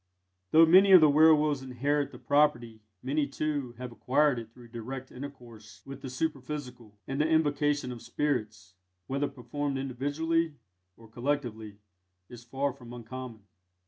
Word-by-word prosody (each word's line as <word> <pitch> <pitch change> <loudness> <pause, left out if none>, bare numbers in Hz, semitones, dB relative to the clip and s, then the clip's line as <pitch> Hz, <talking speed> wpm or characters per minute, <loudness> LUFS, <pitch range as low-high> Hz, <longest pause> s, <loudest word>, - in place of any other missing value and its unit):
Though 165 +1 +7
many 190 +4 +6
of 185 - +11
the 155 -2 +6
werwolves 150 -2 +4
inherit 140 +3 -1
the - - -11
property, 120 -7 +1 0.2
many, 140 +3 0
too, 140 -3 -3
have 125 -1 -7
acquired 135 +2 +1
it 115 -1 -10
through 120 0 -16
direct 125 +3 -7
intercourse 120 -5 -11
with 135 0 -9
the 135 - -6
superphysical; 130 -5 -5
and 135 +2 -1
the 155 - +2
invocation 145 -3 +1
of 120 -2 -8
spirits, 110 -10 -3 0.3
whether 140 +5 -1
performed 140 +3 -4
individually 145 +5 -1 0.4
or 115 - -16
collectively, 115 -4 -3 0.5
is 120 -1 -11
far 135 +3 -2
from 120 -2 -12
uncommon. 120 -1 -8
135 Hz, 145 wpm, -29 LUFS, 120-145 Hz, 0.5 s, of